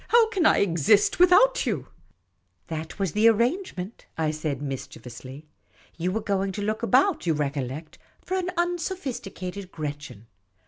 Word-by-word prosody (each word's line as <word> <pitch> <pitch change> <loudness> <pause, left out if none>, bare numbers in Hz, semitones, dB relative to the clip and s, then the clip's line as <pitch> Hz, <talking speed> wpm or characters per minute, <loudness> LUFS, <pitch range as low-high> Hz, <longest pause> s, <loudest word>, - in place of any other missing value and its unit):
How 465 -1 +5
can 370 -8 +3
I - - +5
exist 195 - +3
without 380 +8 +5
you? - - -2 0.2
" - - -47
" - - -46
That 160 0 -5
was 195 -4 -1
the 215 +5 +4
arrangement," 235 - 0
I 160 -1 +1
said, 155 -2 -3
mischievously. 135 0 -7 0.3
" - - -30
You 180 +2 0
were 220 +3 -1
going 195 -2 0
to 205 - -4
look 215 +1 -1
about, 265 - +3
you 165 - +4
recollect, 145 +1 -4 0.2
for 375 - -4
an 365 -1 -1
un 350 0 +1
sophisticated 200 - -5
Gretchen. 145 -8 -6
195 Hz, 165 wpm, -26 LUFS, -, 0.3 s, How